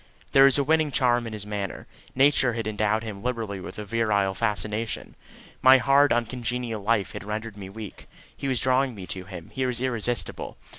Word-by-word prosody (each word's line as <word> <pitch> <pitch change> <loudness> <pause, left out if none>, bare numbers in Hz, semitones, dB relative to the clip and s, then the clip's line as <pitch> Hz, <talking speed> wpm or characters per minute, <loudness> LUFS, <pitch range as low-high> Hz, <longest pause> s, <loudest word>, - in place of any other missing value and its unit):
There 135 0 +7
was 135 0 +5
a 140 - +2
winning 155 +1 +2
charm 120 -3 +2
in 110 - -7
his 105 -2 -5
manner. 100 -2 -4 0.3
Nature 135 -2 +4
had 115 -1 -3
endowed 110 +1 0
him 105 -3 -7
liberally 115 -5 -3
with 90 - -8
virile 105 -2 0
fascination. 105 +1 -2 0.5
My 130 +1 +8
hard 140 +2 +4
uncongenial 120 -1 -1
life 105 -1 +1
had - - -7
rendered 105 +1 -5
me 100 -2 -8
weak. 105 0 -9 0.3
He 140 - -5
was 130 -3 +1
drawing 130 -1 +2
me 95 -3 -8
to 95 0 -6
him; 90 -4 -10
he 130 - -1
was 125 -2 0
irresistible. 120 -2 -2
115 Hz, 185 wpm, -25 LUFS, 105-130 Hz, 0.5 s, My